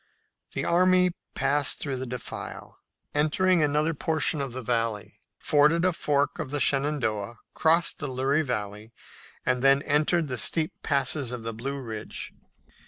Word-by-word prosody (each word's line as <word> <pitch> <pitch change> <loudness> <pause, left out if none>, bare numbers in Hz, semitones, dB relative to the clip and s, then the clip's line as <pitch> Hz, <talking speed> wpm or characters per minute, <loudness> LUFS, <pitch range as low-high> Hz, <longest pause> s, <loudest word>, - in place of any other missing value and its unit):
The - - -2
army 180 +1 +4 0.2
passed 135 +1 +2
through 140 -3 -3
the 130 +1 -5
defile, 125 +1 -7 0.3
entered 155 +5 +1
another 150 +2 +1
portion 155 0 0
of 135 -2 -4
the 130 +1 -6
valley, 115 -3 -2 0.2
forded 150 +4 +3
a 185 - +2
fork 145 -3 0
of 150 -4 -4
the 145 +1 -2
Shenandoah, 130 -7 0 0.2
crossed 165 +1 +2
the 145 - -3
Luray 135 +3 +1
Valley, 105 -4 -4 0.5
and 125 -1 +1
then 135 +1 +4
entered 155 +3 +1
the 125 -2 -3
steep 160 - +2
passes 140 -2 0
of 125 -2 -6
the 115 0 -4
Blue 135 +5 -5
Ridge. 110 -5 -6
140 Hz, 150 wpm, -26 LUFS, 125-155 Hz, 0.5 s, army